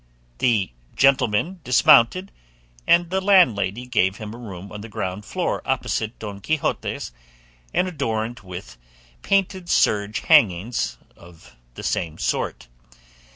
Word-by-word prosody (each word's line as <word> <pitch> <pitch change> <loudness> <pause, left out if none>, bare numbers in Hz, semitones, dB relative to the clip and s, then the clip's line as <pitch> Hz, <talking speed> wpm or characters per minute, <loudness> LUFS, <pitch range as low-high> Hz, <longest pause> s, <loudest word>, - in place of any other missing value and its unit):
The 110 - +1 0.2
gentleman 135 - +2
dismounted, 125 +8 +4 0.6
and 170 0 +4
the 190 0 0
landlady 125 - +3
gave 100 -6 +1
him 110 -1 -7
a - - -9
room 100 -4 -9
on 105 - -7
the 115 - -9
ground 95 0 -4
floor - - -2
opposite 110 +1 -2
Don 100 -2 -7
Quixote's 155 - -2 0.6
and 185 - +1
adorned 120 -7 -3
with 90 -10 -10 0.4
painted 190 -2 0
serge 105 +1 +2
hangings 105 +3 +2 0.2
of 85 -7 -17 0.2
the - - -8
same 80 -2 -2
sort. - - -2
110 Hz, 120 wpm, -22 LUFS, 100-140 Hz, 0.6 s, dismounted